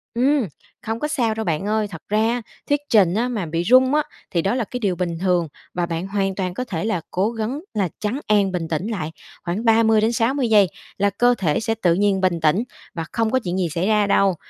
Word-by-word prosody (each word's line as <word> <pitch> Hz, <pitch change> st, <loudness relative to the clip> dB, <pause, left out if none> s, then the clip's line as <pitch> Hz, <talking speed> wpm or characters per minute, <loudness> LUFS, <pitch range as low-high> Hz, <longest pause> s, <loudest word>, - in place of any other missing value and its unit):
Ừm, 260 Hz, -1 st, +2 dB, 0.3 s
không 225 Hz, +1 st, -3 dB
có 300 Hz, -, -1 dB
sao 245 Hz, -8 st, 0 dB
đâu, 220 Hz, 0 st, -3 dB
bạn 160 Hz, +2 st, -1 dB
ơi. 215 Hz, -1 st, +1 dB
Thật -, -, -9 dB
ra, 225 Hz, +3 st, +1 dB, 0.3 s
thuyết 290 Hz, 0 st, +3 dB
trình 195 Hz, -6 st, +5 dB
á 235 Hz, +3 st, +1 dB
mà 220 Hz, -8 st, -2 dB
bị 165 Hz, +2 st, -2 dB
run 255 Hz, +6 st, +5 dB
á 300 Hz, -, +3 dB, 0.3 s
thì 170 Hz, -, +1 dB
đó 195 Hz, +7 st, 0 dB
là 250 Hz, -, 0 dB
cái 250 Hz, +4 st, -5 dB
điều 195 Hz, -5 st, 0 dB
bình 170 Hz, -2 st, -2 dB
thường 180 Hz, -3 st, +1 dB, 0.3 s
và 175 Hz, -1 st, 0 dB
bạn 170 Hz, +2 st, -3 dB
hoàn 195 Hz, -1 st, -1 dB
toàn 185 Hz, -2 st, -2 dB
có 250 Hz, -, -3 dB
thể 185 Hz, -7 st, -4 dB
là 185 Hz, -7 st, 0 dB
cố 195 Hz, +4 st, +1 dB
gắng 230 Hz, +5 st, -3 dB
là 195 Hz, -4 st, 0 dB
trấn 220 Hz, +7 st, -2 dB
an, 205 Hz, -2 st, +3 dB
bình 175 Hz, -3 st, -2 dB
tĩnh 165 Hz, +6 st, -2 dB
lại 160 Hz, -8 st, -3 dB, 0.3 s
khoảng 185 Hz, +7 st, -3 dB
30 225 Hz, -1 st, +4 dB
đến 225 Hz, +2 st, +2 dB
60 245 Hz, +2 st, +1 dB
giây 205 Hz, -3 st, +6 dB, 0.3 s
là 200 Hz, 0 st, +2 dB
cơ 245 Hz, +5 st, +3 dB
thể 155 Hz, -6 st, +1 dB
sẽ 225 Hz, 0 st, -1 dB
tự 180 Hz, -6 st, +2 dB
nhiên 195 Hz, 0 st, +2 dB
bình 180 Hz, -2 st, +1 dB
tĩnh 160 Hz, +8 st, +3 dB, 0.3 s
và 165 Hz, -2 st, -4 dB
không 225 Hz, -1 st, 0 dB
có 260 Hz, -, +3 dB
chuyện 180 Hz, +1 st, -2 dB
gì 180 Hz, -2 st, +1 dB
xảy 175 Hz, +5 st, -1 dB
ra 210 Hz, -2 st, +3 dB
đâu. 195 Hz, -2 st, +3 dB
205 Hz, 245 wpm, -22 LUFS, 180-230 Hz, 0.3 s, giây